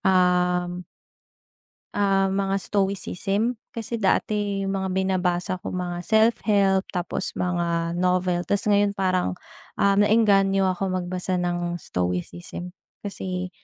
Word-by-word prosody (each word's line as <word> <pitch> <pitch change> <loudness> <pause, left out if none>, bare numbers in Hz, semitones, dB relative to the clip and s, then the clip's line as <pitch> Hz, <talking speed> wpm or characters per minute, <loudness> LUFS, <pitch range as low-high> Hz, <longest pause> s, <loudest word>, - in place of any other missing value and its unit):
um 180 -1 +2 1.1
ah, 195 -1 +2
mga 195 0 0
stoicism. 200 +3 0 0.2
Kasi 230 0 -4
dati 200 0 0
yung 195 0 -1
mga 190 0 -2
binabasa 185 -1 0
ko - - -5
mga 175 -1 -3
self-help, 210 -3 +3
tapos 180 -2 -3
mga 170 -1 -1
novel. 180 -1 +1
Tas 200 - +1
ngayon 205 0 +3
parang, 185 - 0 0.4
um, 200 0 +3
naengganyo 195 -3 +4
ako 190 +2 -2
magbasa 185 0 -2
ng 175 -1 -1
stoicism 90 - -4 0.3
kasi 185 -2 -4
190 Hz, 110 wpm, -24 LUFS, 180-200 Hz, 1.1 s, naengganyo